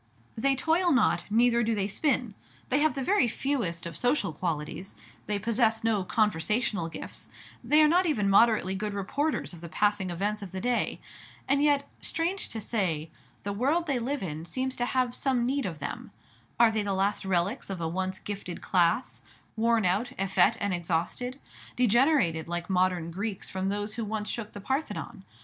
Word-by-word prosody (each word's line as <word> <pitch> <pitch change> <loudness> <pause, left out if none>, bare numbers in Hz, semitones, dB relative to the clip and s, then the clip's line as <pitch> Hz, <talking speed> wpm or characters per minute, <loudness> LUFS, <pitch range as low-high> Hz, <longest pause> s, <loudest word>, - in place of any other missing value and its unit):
They 270 +4 +2
toil 330 +6 +2
not, 255 -7 +3
neither 235 +2 +4
do 225 -1 +1
they 200 -2 0
spin. 245 +1 0 0.4
They 270 - +3
have 310 0 +2
the 270 - -2
very 375 -6 +3
fewest 225 - -2
of 170 -2 -6
social 245 - +1
qualities; 165 +3 -4 0.3
they 210 - +1
possess 225 +1 +1
no 220 -4 +2
conversational 210 -1 0
gifts; - - -8 0.3
they 305 +1 +5
are - - +7
not 355 +3 +3
even 215 -11 +1
moderately 200 -1 +4
good 205 +1 -3
reporters 280 - -1
of 170 - -11
the 170 - -8
passing 205 0 +1
events 205 +5 -1
of 190 -2 -8
the 190 - -3
day. 245 +3 0 0.5
And 275 +1 +3
yet, 285 -1 +3
strange 345 +4 -2
to 225 - -5
say, 180 -8 -1 0.3
the 200 - -2
world 285 +11 +1
they 275 -5 0
live 260 +1 -2
in 155 -3 -4
seems 260 +8 -3
to 245 - 0
have 255 -2 +1
some 255 -3 0
need 270 -2 0
of 165 -4 -5
them. - - -6 0.5
Are 235 -1 +6
they 220 -1 0
the 200 -1 -1
last 195 +2 0
relics 190 +5 0
of 190 -2 -4
a 165 - -1
once 185 +3 -2
gifted 200 -4 -6
class, 180 +7 +1 0.3
worn 230 -1 +2
out, 195 +7 +1
effete, 195 0 +3
and 200 -2 0
exhausted, 175 +10 -2 0.4
degenerated 235 - +3
like 175 +2 -3
modern 180 -2 +1
Greeks 200 +2 -4
from 190 0 -1
those 205 +1 -3
who 230 - -3
once 215 0 -3
shook 225 -2 -5
the 205 - -8
Parthenon? 265 +9 -3
210 Hz, 180 wpm, -28 LUFS, 190-255 Hz, 0.5 s, are